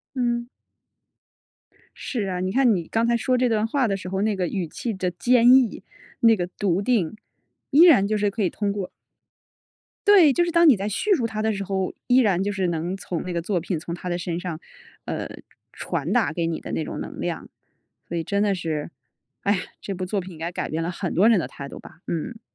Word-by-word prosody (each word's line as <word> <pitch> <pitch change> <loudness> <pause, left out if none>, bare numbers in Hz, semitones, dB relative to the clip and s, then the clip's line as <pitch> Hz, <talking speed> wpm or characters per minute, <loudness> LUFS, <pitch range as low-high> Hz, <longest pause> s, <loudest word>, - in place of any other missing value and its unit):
嗯。 240 -1 -1 1.5
是 220 -7 -3
啊， 180 -1 -2
你 185 +1 -1
看 245 -2 +4
你 170 -3 -3
刚 225 +1 +1
才 235 0 +2
说 255 +2 +1
这 250 0 +2
段 220 -1 +1
话 255 +1 +1
的 195 - 0
时 185 -1 -7
候， 190 +1 -1
那 215 -2 +1
个 180 -2 0
语 185 0 -2
气 230 +8 -4
的 185 -2 -2
坚 240 +7 +4
毅， 255 -8 +3 0.4
那 230 -1 +6
个 175 -1 -2
笃 190 -3 +1
定， 215 -6 +1 0.5
依 300 +3 +6
然 255 - +6
就 215 +1 0
是 205 -1 +1
可 215 +2 -3
以 180 - +1
通 205 -1 -2
过 200 -3 -4 1.2
对， 380 -8 +7
就 345 - +2
是 345 - -2
当 335 0 +5
你 270 - +7
在 200 +1 -3
叙 400 - 0
述 245 -10 0
她 215 -1 -3
的 220 0 +1
时 200 -1 -3
候， 190 -1 -2
依 250 +1 +4
然 200 -7 +3
就 205 +1 -1
是 195 -2 -1
能 170 +3 -2
从 180 -2 -4
那 180 - -5
个 170 -1 -2
作 180 0 -1
品 175 0 -3
从 170 +2 -6
她 180 +1 -6
的 175 - -1
身 175 -1 -3
上， 175 -4 -5 0.5
呃， - - -4 0.4
传 - - -3
达 - - +2
给 165 +1 -1
你 165 -1 -2
的 - - -7
那 160 - -1
种 - - -6
能 - - -7
量。 - - -4 0.6
所 170 - -4
以 165 - -2
真 200 0 0
的 205 -1 +2
是， 160 -4 -3 0.5
唉 200 - +2
呀， 195 - 0 0.2
这 195 - -5
部 185 0 -4
作 200 +2 -1
品 185 0 -9
应 160 - -12
该 165 +2 -3
改 175 - -4
变 160 +1 -2
了 165 - -2
很 180 0 -4
多 200 +6 +5
人 230 -4 +5
的 - - -1
态 140 - -9
度 - - -9
吧。 - - -15
嗯。 220 +8 -4
195 Hz, 255 characters per minute, -24 LUFS, 175-230 Hz, 1.5 s, 对